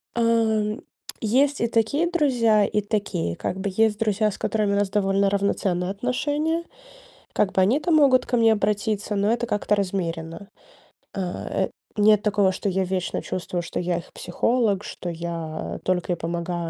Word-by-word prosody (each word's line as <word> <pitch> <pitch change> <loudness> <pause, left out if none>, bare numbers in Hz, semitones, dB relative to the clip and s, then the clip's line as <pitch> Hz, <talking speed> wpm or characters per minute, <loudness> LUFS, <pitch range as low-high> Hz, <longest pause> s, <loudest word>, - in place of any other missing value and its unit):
А, - - -1
м, 220 -2 +1 0.4
есть 270 +6 +2
и 235 - +2
такие 235 +9 +1
друзья, 240 - +3
и 210 - 0
такие, 200 - -2
как 185 - -3
бы, 200 +1 -2
есть 220 0 +2
друзья, 215 -1 +1
с - - -8
которыми 210 -2 0
у - - +2
нас 200 -1 +1
довольно 195 -1 +2
равноценные 195 -2 0
отношения. 290 +10 -1 0.7
Как 195 - +1
бы, 190 - +3
они-то 285 - +2
могут 275 -5 +5
ко 245 - 0
мне 225 -1 +5
обратиться, 210 0 -1
но 200 +2 +2
это 240 0 -1
как-то 210 -1 +1
размеренно. 180 -2 -3 0.7
Э, 185 -3 -2 0.3
нет 210 0 +5
такого, 205 -2 +3
что 195 +2 -2
я 190 +1 0
вечно 185 -1 -2
чувствую, 180 -1 -3
что 165 - -5
я 175 -1 -1
их 170 - -9
психолог, 210 +2 0
что 175 - -6
я 165 -2 -5
только 180 -1 0
и - - -1
помогаю, 170 0 -3
205 Hz, 165 wpm, -24 LUFS, 185-225 Hz, 0.7 s, могут